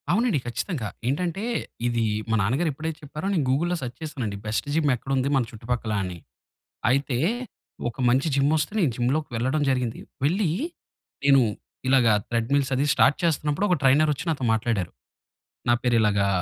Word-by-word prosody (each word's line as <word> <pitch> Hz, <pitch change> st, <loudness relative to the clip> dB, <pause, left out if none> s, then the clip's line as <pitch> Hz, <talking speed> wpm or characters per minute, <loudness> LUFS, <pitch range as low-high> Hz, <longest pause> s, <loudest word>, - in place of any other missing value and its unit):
అవునండి, 225 Hz, -, +2 dB
ఖచ్చితంగా. 120 Hz, -, -3 dB, 0.2 s
ఏంటంటే, 175 Hz, +8 st, -1 dB, 0.4 s
ఇది 120 Hz, -1 st, 0 dB, 0.3 s
మా 110 Hz, -, +2 dB
నాన్నగారెప్పుడైతే 155 Hz, -, -1 dB
చెప్పారో 150 Hz, +5 st, -5 dB
నేను 165 Hz, -6 st, +2 dB
గూగుల్లో 170 Hz, +7 st, +1 dB
సెర్చ్ 125 Hz, -1 st, -6 dB
చేసానండి. 125 Hz, -10 st, -4 dB
బెస్ట్ 110 Hz, +6 st, -1 dB
జిమ్ 155 Hz, -3 st, +3 dB
ఎక్కడుంది 135 Hz, +2 st, -1 dB
మన 135 Hz, -, +3 dB
చుట్టుపక్కలా 115 Hz, -1 st, -2 dB
అని. 90 Hz, -2 st, -5 dB, 0.7 s
అయితే 135 Hz, -1 st, +1 dB, 0.7 s
ఒక 115 Hz, -, -12 dB
మంచి 130 Hz, +6 st, +2 dB
జిమ్మొస్తే 150 Hz, +4 st, +2 dB
నేను 160 Hz, -10 st, +3 dB
జిమ్‌లోకెళ్లడం 130 Hz, +1 st, 0 dB
జరిగింది. 125 Hz, -3 st, -1 dB, 0.3 s
వెళ్లీ 180 Hz, +4 st, +2 dB, 0.7 s
నేను 140 Hz, -1 st, +6 dB, 0.5 s
ఇలాగ 130 Hz, -2 st, +5 dB, 0.2 s
ట్రెడ్మిల్స్ 130 Hz, +4 st, +1 dB
అది 135 Hz, +3 st, +1 dB
స్టార్ట్ 140 Hz, +1 st, +4 dB
చేస్తున్నప్పుడు 150 Hz, +2 st, +1 dB
ఒక 180 Hz, -, +4 dB
ట్రైనరొచ్చి 145 Hz, +3 st, +3 dB
నాతో 145 Hz, -5 st, -1 dB
మాట్లాడారు. 110 Hz, -5 st, -1 dB, 0.8 s
నా 120 Hz, -, +5 dB
పేరు 120 Hz, -1 st, +2 dB
ఇలాగా, 100 Hz, -2 st, +2 dB
135 Hz, 140 wpm, -25 LUFS, 120-155 Hz, 0.8 s, నేను